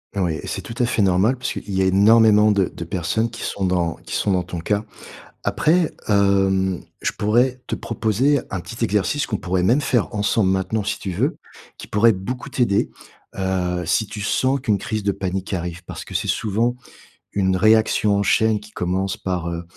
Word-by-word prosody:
Heu, 100 - 0
oui, 80 -4 -1
c'est - - -4
tout 115 - -7
à - - +4
fait 115 - 0
normal 95 +7 +3
parce 120 -1 -3
qu'il - - -8
y 95 - +1
a - - +2
énormément 105 +2 +5
de 100 -2 +2
de - - -6
personnes 90 +6 -1
qui 115 0 -8
sont 100 - -3
dans 90 -3 +1
qui - - -5
sont 100 - +1
dans 90 -1 +2
ton 90 -1 -6
cas. 105 +5 -1 0.6
Après, 165 +1 +2
hem, 95 -3 +2 0.2
je - - +1
pourrais 125 +5 +1
te - - -2
proposer 115 +6 +1
un 95 - -3
petit 100 +8 -6
exercice 105 +7 0
qu'on 105 - -2
pourrait 90 0 -1
même 120 +10 +3
faire 120 -4 0
ensemble 105 -1 +2
maintenant 95 +3 0
si 100 - -2
tu 95 - -5
veux, 85 - -1 0.4
qui - - -9
pourrait 110 +3 +4
beaucoup 120 +7 -5
t'aider, 115 -6 +1 0.5
heu, 90 -2 -1
si 100 +6 +1
tu 105 0 -7
sens 130 +6 +1
qu'une 105 -2 +1
crise 110 +2 -3
de 100 - +2
panique 95 0 -4
arrive 85 -1 -4
parce - - -7
que - - -10
c'est - - -1
souvent 115 +3 0 0.6
une 95 -2 +1
réaction 110 0 +3
en 100 - +1
chaîne 110 +1 +2
qui 105 0 -14
commence 95 +1 -2
par, 90 -2 -3
heu, 85 0 -4
100 Hz, 200 wpm, -21 LUFS, 95-110 Hz, 0.6 s, énormément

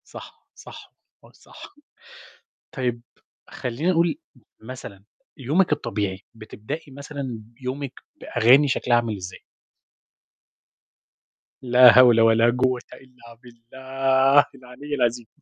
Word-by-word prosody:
صح، - - -13
صح، - - -14 0.3
آه، - - -18
صح. - - -15 1.0
طيب 120 -3 -3 0.5
خلينا 130 +8 -3
نقول 170 - 0 0.4
مثلًا 110 -5 -11 0.3
يومِك 155 +6 0
الطبيعي، 105 -9 -3
بتبدئي 115 +7 -9
مثلًا 140 -4 -7 0.2
يومِك 130 +1 -5 0.3
بأغاني 130 +5 +3
شكلها 125 -2 +1
عامل 115 -3 -1
إزاي؟ 90 -1 -10 2.2
لا 125 -1 +6
هول 120 -3 +6
ولا 115 +1 +4
جوة 125 0 0
إلا 125 -3 -17
بالله 130 +3 +1
العلي 135 +3 -8
العظيم 120 -2 -1
125 Hz, 95 wpm, -22 LUFS, 115-135 Hz, 2.2 s, لا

